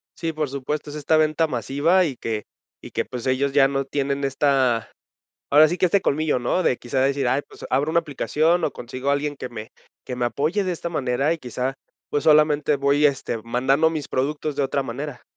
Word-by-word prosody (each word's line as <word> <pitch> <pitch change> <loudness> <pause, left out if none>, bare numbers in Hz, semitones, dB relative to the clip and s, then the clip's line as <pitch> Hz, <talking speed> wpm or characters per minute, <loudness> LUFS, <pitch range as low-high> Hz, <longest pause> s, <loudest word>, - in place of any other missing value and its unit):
Sí, 165 -1 -3
por 155 -2 -2
supuesto, 140 +2 -4
es 145 - -8
esta 150 +1 +1
venta 155 +1 +2
masiva 145 - +2
y 140 -5 -3
que 110 -2 -4 0.4
y - - -11
que, - - -1
pues, 125 -2 -7
ellos 135 +2 +1
ya 135 -1 +5
no 135 0 -2
tienen 140 0 -2
esta, 135 -4 +1 0.6
ahora 150 +2 +7
sí 175 - -2
que, - - +4
este 195 +3 +2
colmillo, 155 -4 +1
¿no?, 125 +9 0
de 130 - +2
quizá 125 +3 -2
decir: 135 0 +1
"Ay, 135 +3 +1
pues, - - -12
abro 145 +3 +1
una 170 - +3
aplicación 160 +3 0
o - - 0
consigo 130 +3 -4
a - - +4
alguien 145 +1 -2
que 130 - -6
me 110 -2 -8 0.4
que 125 - -4
me 125 - -1
apoye 155 - 0
de 185 - -1
esta 170 0 -4
manera 135 0 0
y 165 - -3
quizá, 125 0 -3 0.4
pues, 145 - 0
solamente, 150 -1 +4
voy, 140 +2 +2
este, 135 -4 -1
mandando 130 +7 +2
mis 155 -3 -4
productos 150 +3 -2
de 145 - +1
otra 135 +1 0
manera". 135 +1 -6
140 Hz, 215 wpm, -23 LUFS, 130-155 Hz, 0.6 s, ahora